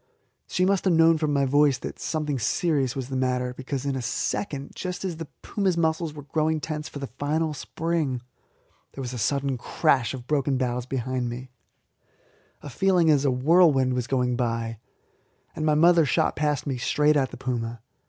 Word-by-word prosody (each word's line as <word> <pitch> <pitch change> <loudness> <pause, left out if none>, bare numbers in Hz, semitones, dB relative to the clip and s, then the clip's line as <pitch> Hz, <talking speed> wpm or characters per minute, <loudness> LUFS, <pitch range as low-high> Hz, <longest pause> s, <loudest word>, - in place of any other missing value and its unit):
She 180 - +1
must 195 0 +1
have 180 -3 +4
known 165 0 +5
from 155 -2 0
my 140 -1 +2
voice 145 0 +3
that - - -7
something 150 -4 -2
serious 140 - 0
was 130 -2 -4
the 135 - -4
matter, 125 -1 0
because 130 +1 -5
in 140 -1 -1
a 130 - -2
second, 140 - -3
just 180 +1 -5
as 175 -4 -3
the 165 -1 -6 0.2
puma's 190 -4 0
muscles 160 0 0
were 145 -1 -10
growing 155 +2 0
tense 150 0 -5
for - - -8
the 140 - -4
final 155 +3 -2
spring, 155 -2 -2 0.7
there 135 - -7
was 125 0 -5
a 125 - -4
sudden 135 +3 0
crash 130 -4 +1
of 125 -2 -9
broken 140 -1 +1
boughs 125 -1 -2
behind 130 -1 -2
me, 125 +2 -7 1.1
a 145 - -7
feeling 180 +1 +3
as 145 -1 +3
if - - +4
a 130 - 0
whirlwind 135 -2 +4
was 125 -1 -2
going 125 -2 +1
by, 115 -2 -2 0.8
and 155 - -1
my 150 - +4
mother 170 +2 +6
shot 120 -6 +1
past 150 -2 0
me 135 -3 -2
straight 150 +4 +2
at 135 -3 +2
the - - -10
puma. 120 -2 -3
140 Hz, 190 wpm, -25 LUFS, 125-160 Hz, 1.1 s, mother